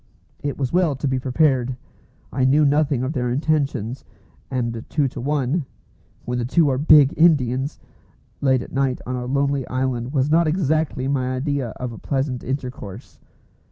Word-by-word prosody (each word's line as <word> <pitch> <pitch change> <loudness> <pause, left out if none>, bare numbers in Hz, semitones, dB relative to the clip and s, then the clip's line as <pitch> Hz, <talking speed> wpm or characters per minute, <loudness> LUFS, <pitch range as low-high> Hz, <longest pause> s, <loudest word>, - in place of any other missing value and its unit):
It 145 -1 -3
was 135 0 -2
well 175 -5 +2
to 135 +2 -2
be 130 -1 0
prepared. 130 -2 +1 0.6
I 130 - 0
knew 145 +4 +4
nothing 145 -2 +2
of 130 +4 -2
their 125 -4 -1
intentions, 135 -3 -1 0.5
and 120 -3 -2
two 145 -3 +1
to 125 - -7
one 145 +3 0 0.6
(when 125 0 -2
the - - -1
two 150 +4 +3
are 130 -1 0
big 150 -2 +6
Indians!) 140 -4 +2 0.6
late 130 -3 +2
at - - -12
night 135 -1 0
on 125 - -3
a 125 0 -4
lonely 140 0 0
island 130 -1 -2
was 140 0 +1
not 165 +1 +4
exactly 155 -5 0
my 130 -2 0
idea 140 -2 -1
of 120 -3 -5
pleasant 135 -3 -2
intercourse. 115 - -6
135 Hz, 160 wpm, -22 LUFS, 125-145 Hz, 0.6 s, big